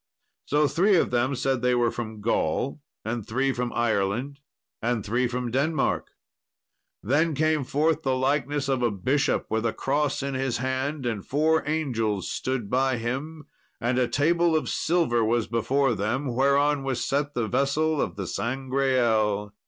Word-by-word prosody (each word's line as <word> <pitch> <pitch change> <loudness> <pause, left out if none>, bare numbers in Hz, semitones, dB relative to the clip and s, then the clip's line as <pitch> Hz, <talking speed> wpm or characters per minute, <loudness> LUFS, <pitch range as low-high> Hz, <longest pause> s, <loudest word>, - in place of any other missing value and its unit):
So 150 +1 +2
three 190 +7 +3
of 170 - +2
them 125 +3 +1
said 130 0 0
they 125 0 +2
were 120 -1 +2
from 110 -3 -6
Gaul; 115 - -1 0.2
and 115 0 -2
three 130 +5 0
from 125 -1 -2
Ireland; 120 +4 -1 0.4
and 115 -2 -1
three 120 +4 +1
from 125 0 -3
Denmark. 140 +3 0 1.0
Then 150 +7 +2
came 155 0 +1
forth 155 +4 +1
the 130 -3 0
likeness 140 +1 0
of 135 -2 0
a 120 - +3
bishop, 130 +8 0
with 110 0 0
a 115 - 0
cross 145 0 -1
in 140 0 -2
his 130 -2 -1
hand, 130 +2 -2
and 110 -5 -2
four 155 +3 +2
angels 115 - -1
stood 130 -5 -2
by 130 +2 +1
him, 135 +7 -4 0.3
and 120 +2 0
a 125 - +2
table 165 +6 +2
of 155 - 0
silver 155 -9 +1
was 115 0 +1
before 130 +3 +1
them, 120 +6 -2
whereon 140 +2 +2
was 130 -3 -2
set 145 +1 -1
the 115 -2 0
vessel 145 +7 +1
of - - -2
the 100 -2 -4
Sangreal. 120 -4 0
130 Hz, 160 wpm, -26 LUFS, 120-145 Hz, 1.0 s, three